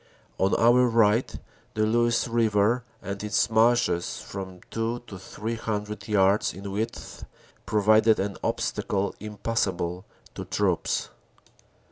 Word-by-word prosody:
On 95 Hz, +1 st, +2 dB
our 120 Hz, +2 st, +5 dB
right 115 Hz, 0 st, +2 dB, 0.4 s
the 110 Hz, 0 st, +2 dB
Luce 120 Hz, +2 st, +2 dB
river 115 Hz, 0 st, +2 dB, 0.2 s
and 100 Hz, +1 st, -5 dB
its 105 Hz, +1 st, +1 dB
marshes, 110 Hz, -6 st, +2 dB
from 95 Hz, -2 st, -8 dB
two 115 Hz, +2 st, -2 dB
to 100 Hz, -5 st, -9 dB
three 110 Hz, +4 st, -5 dB
hundred 105 Hz, -1 st, -4 dB
yards 100 Hz, -3 st, +2 dB
in 100 Hz, +1 st, -7 dB
width, 110 Hz, +4 st, -5 dB, 0.4 s
provided 110 Hz, +1 st, +4 dB
an 100 Hz, 0 st, -2 dB
obstacle 100 Hz, 0 st, -1 dB
impassable 100 Hz, -4 st, -2 dB, 0.3 s
to -, -, -6 dB
troops. -, -, -1 dB
105 Hz, 115 wpm, -26 LUFS, 100-115 Hz, 0.4 s, our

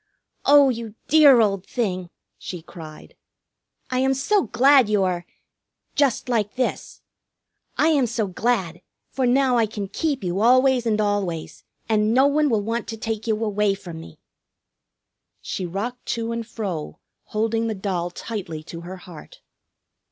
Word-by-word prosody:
"Oh, 285 Hz, -1 st, +7 dB
you 230 Hz, -3 st, -4 dB
dear 285 Hz, -5 st, +7 dB
old 195 Hz, -3 st, +1 dB
thing!" 185 Hz, -7 st, -3 dB, 0.3 s
she 175 Hz, -3 st, -7 dB
cried. 155 Hz, -3 st, -12 dB, 0.8 s
"I 255 Hz, -, +1 dB
am 265 Hz, +1 st, +2 dB
so 390 Hz, +10 st, +2 dB
glad 260 Hz, -1 st, +5 dB
you 205 Hz, -2 st, +2 dB
are 175 Hz, -2 st, -2 dB, 0.7 s
just 275 Hz, -5 st, +1 dB
like 220 Hz, -4 st, -1 dB
this. 255 Hz, 0 st, -3 dB, 0.7 s
I 315 Hz, -, +4 dB
am 285 Hz, -6 st, +3 dB
so 230 Hz, -1 st, -1 dB
glad, 185 Hz, -4 st, -1 dB, 0.3 s
for 260 Hz, -2 st, 0 dB
now 255 Hz, 0 st, +3 dB
I 225 Hz, -2 st, +3 dB
can 205 Hz, -2 st, -5 dB
keep 280 Hz, -, -2 dB
you 180 Hz, +1 st, -1 dB
always 255 Hz, +1 st, +4 dB
and 215 Hz, -1 st, +1 dB
always, 205 Hz, -6 st, -2 dB, 0.2 s
and 215 Hz, 0 st, +2 dB
no 265 Hz, +2 st, +5 dB
one 295 Hz, +1 st, +2 dB
will 220 Hz, -4 st, +1 dB
want 230 Hz, +2 st, -3 dB
to 225 Hz, -, -5 dB
take 220 Hz, 0 st, -4 dB
you 220 Hz, 0 st, 0 dB
away 210 Hz, -1 st, +1 dB
from 175 Hz, -5 st, -9 dB
me." 80 Hz, -, -13 dB, 1.2 s
She 185 Hz, -, -4 dB
rocked 225 Hz, +8 st, -5 dB
to 230 Hz, 0 st, -3 dB
and 230 Hz, -1 st, -4 dB
fro, 190 Hz, -10 st, -5 dB, 0.3 s
holding 225 Hz, +1 st, -1 dB
the 220 Hz, -, -2 dB
doll 185 Hz, -3 st, -2 dB
tightly 175 Hz, -5 st, -6 dB
to 165 Hz, +1 st, -9 dB
her 180 Hz, +2 st, -8 dB
heart. 175 Hz, -3 st, -13 dB
220 Hz, 155 wpm, -23 LUFS, 190-250 Hz, 1.2 s, Oh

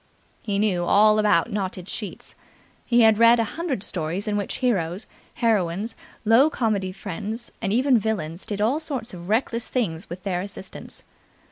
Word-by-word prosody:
He 200 Hz, -2 st, -2 dB
knew 200 Hz, -4 st, +1 dB
all 215 Hz, +4 st, +5 dB
about 210 Hz, 0 st, +3 dB
knotted 190 Hz, -3 st, -3 dB
sheets. 210 Hz, -1 st, -6 dB, 0.5 s
He 240 Hz, 0 st, +4 dB
had 220 Hz, -1 st, +5 dB
read 230 Hz, +1 st, +7 dB
a -, -, +3 dB
hundred 300 Hz, -, -2 dB
stories 175 Hz, +3 st, -3 dB
in 210 Hz, -, 0 dB
which 205 Hz, -1 st, -2 dB
heroes, 195 Hz, -6 st, 0 dB, 0.3 s
heroines, 215 Hz, -2 st, 0 dB, 0.3 s
low 235 Hz, +7 st, +6 dB
comedy 215 Hz, -9 st, -1 dB
friends 210 Hz, +4 st, -4 dB
and 195 Hz, -, -1 dB
even 250 Hz, +2 st, +4 dB
villains 185 Hz, -6 st, -3 dB
did 205 Hz, -1 st, -3 dB
all 245 Hz, +8 st, +2 dB
sorts 265 Hz, -8 st, -4 dB
of 175 Hz, 0 st, -9 dB
reckless 230 Hz, +1 st, 0 dB
things 185 Hz, -8 st, -2 dB
with 180 Hz, +1 st, -7 dB
their 180 Hz, -3 st, -1 dB
assistance. 195 Hz, -1 st, -7 dB
210 Hz, 160 wpm, -24 LUFS, 185-230 Hz, 0.5 s, read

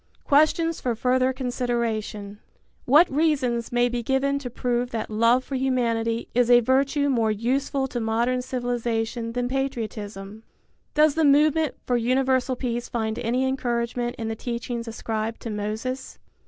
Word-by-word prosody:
Questions 310 Hz, +3 st, +2 dB
for 245 Hz, -2 st, -1 dB
Further 255 Hz, +2 st, +2 dB
Consideration. 235 Hz, -5 st, -3 dB, 0.5 s
What 300 Hz, +7 st, +6 dB
reasons 270 Hz, -6 st, +1 dB
may 240 Hz, 0 st, +3 dB
be 245 Hz, 0 st, -2 dB
given 270 Hz, +3 st, 0 dB
to 260 Hz, -3 st, -6 dB
prove 245 Hz, 0 st, -1 dB
that 225 Hz, -2 st, -4 dB
love 230 Hz, +4 st, +3 dB
for 275 Hz, -, -9 dB
humanity 235 Hz, -3 st, 0 dB
is 245 Hz, 0 st, +2 dB
a 240 Hz, 0 st, +8 dB
virtue 275 Hz, +4 st, +2 dB
more 235 Hz, -5 st, +2 dB
useful 265 Hz, +5 st, 0 dB
to 245 Hz, -, -3 dB
modern 235 Hz, +3 st, 0 dB
civilization 240 Hz, -2 st, -2 dB
than 245 Hz, 0 st, -1 dB
patriotism? 215 Hz, -6 st, -4 dB, 0.5 s
Does 305 Hz, 0 st, +5 dB
the 320 Hz, -, +1 dB
movement 300 Hz, +1 st, +3 dB
for 245 Hz, -, +1 dB
universal 255 Hz, +2 st, +1 dB
peace 240 Hz, -1 st, -3 dB
find 220 Hz, -1 st, -2 dB
any 245 Hz, +2 st, 0 dB
encouragement 240 Hz, -2 st, -2 dB
in 225 Hz, -, -4 dB
the 225 Hz, -, -2 dB
teachings 235 Hz, 0 st, -4 dB
ascribed 225 Hz, 0 st, -3 dB
to 230 Hz, -, -5 dB
Moses? 220 Hz, +6 st, -4 dB
245 Hz, 145 wpm, -24 LUFS, 230-265 Hz, 0.5 s, a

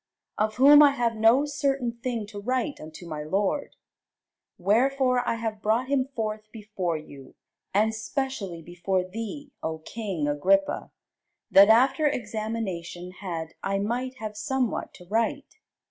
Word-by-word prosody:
Of 215 Hz, 0 st, +1 dB
whom 285 Hz, +3 st, +8 dB
I 285 Hz, -1 st, +7 dB
have 235 Hz, -4 st, 0 dB
no 225 Hz, +6 st, +4 dB
certain 275 Hz, -4 st, -1 dB
thing 235 Hz, -2 st, -4 dB
to 205 Hz, -1 st, -7 dB
write 255 Hz, +5 st, -1 dB
unto 155 Hz, +3 st, -10 dB
my 155 Hz, -2 st, -5 dB
lord. 195 Hz, -, -1 dB, 0.8 s
Wherefore 250 Hz, +6 st, +2 dB
I -, -, +1 dB
have 225 Hz, -2 st, -4 dB
brought 230 Hz, +5 st, +1 dB
him 270 Hz, -2 st, +1 dB
forth 215 Hz, -1 st, -4 dB
before 205 Hz, -6 st, -3 dB
you, 140 Hz, -3 st, -12 dB, 0.4 s
and 215 Hz, +3 st, +2 dB
specially 220 Hz, -, -4 dB
before 180 Hz, +2 st, -1 dB
thee, 230 Hz, +8 st, -6 dB
O 160 Hz, 0 st, -3 dB
king 180 Hz, -2 st, -4 dB
Agrippa, 290 Hz, -, +1 dB, 0.6 s
that, 200 Hz, +2 st, +8 dB
after 265 Hz, +6 st, +5 dB
examination 210 Hz, -7 st, -4 dB
had, 170 Hz, -4 st, -6 dB
I 195 Hz, 0 st, -1 dB
might 245 Hz, +6 st, -2 dB
have 215 Hz, -4 st, -6 dB
somewhat 245 Hz, +3 st, -1 dB
to 180 Hz, -, -14 dB
write. 230 Hz, -, -2 dB
220 Hz, 140 wpm, -26 LUFS, 190-255 Hz, 0.8 s, whom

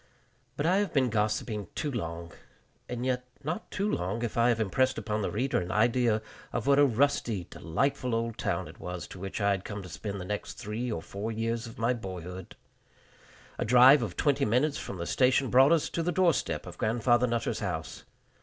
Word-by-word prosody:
But 145 Hz, -, -1 dB
I 180 Hz, +3 st, +4 dB
have 200 Hz, -4 st, 0 dB
been 130 Hz, -4 st, +2 dB
gossiping 105 Hz, -1 st, -1 dB
too 150 Hz, -, -2 dB
long 85 Hz, -7 st, -5 dB, 0.6 s
and 125 Hz, 0 st, -3 dB
yet 125 Hz, -1 st, -1 dB, 0.2 s
not 170 Hz, +9 st, -4 dB
too 200 Hz, +1 st, -1 dB
long 100 Hz, -, -2 dB
if 115 Hz, -, -3 dB
I 120 Hz, +1 st, +4 dB
have 115 Hz, -2 st, +2 dB
impressed 130 Hz, +5 st, +1 dB
upon 105 Hz, -1 st, -2 dB
the -, -, -1 dB
reader 125 Hz, +2 st, 0 dB
an 90 Hz, +1 st, -4 dB
idea 115 Hz, 0 st, +2 dB, 0.3 s
of -, -, -2 dB
what 140 Hz, 0 st, +5 dB
a 145 Hz, -, +7 dB
rusty, 120 Hz, -5 st, +1 dB
delightful 125 Hz, -, -1 dB
old 115 Hz, 0 st, -2 dB
town -, -, -1 dB
it -, -, -13 dB
was 90 Hz, 0 st, -6 dB
to 95 Hz, -, -10 dB
which 95 Hz, +3 st, -5 dB
I 100 Hz, -1 st, +3 dB
had 95 Hz, -1 st, -1 dB
come 100 Hz, -1 st, -6 dB
to 90 Hz, -, -9 dB
spend 100 Hz, +5 st, -5 dB
the 90 Hz, -, -6 dB
next 105 Hz, +2 st, -4 dB
three 115 Hz, +4 st, -4 dB
or 80 Hz, -6 st, -3 dB
four 100 Hz, +5 st, -5 dB
years 115 Hz, +1 st, -2 dB
of 115 Hz, -, -11 dB
my 115 Hz, +2 st, +2 dB
boyhood. 95 Hz, -4 st, -7 dB, 1.0 s
A -, -, +1 dB
drive 125 Hz, +4 st, +7 dB
of 110 Hz, -, -4 dB
twenty 140 Hz, -2 st, +2 dB
minutes 135 Hz, +7 st, +2 dB
from 95 Hz, -, -6 dB
the 85 Hz, -, -4 dB
station 130 Hz, +5 st, +2 dB
brought 135 Hz, +4 st, +6 dB
us 165 Hz, -3 st, +3 dB
to 170 Hz, -, -2 dB
the 175 Hz, +2 st, 0 dB
door 180 Hz, -2 st, +4 dB
step -, -, -2 dB
of -, -, -10 dB
Grandfather 120 Hz, +2 st, +2 dB
Nutter's 120 Hz, -1 st, -1 dB
house. 85 Hz, -6 st, -4 dB
115 Hz, 210 wpm, -29 LUFS, 100-130 Hz, 1.0 s, a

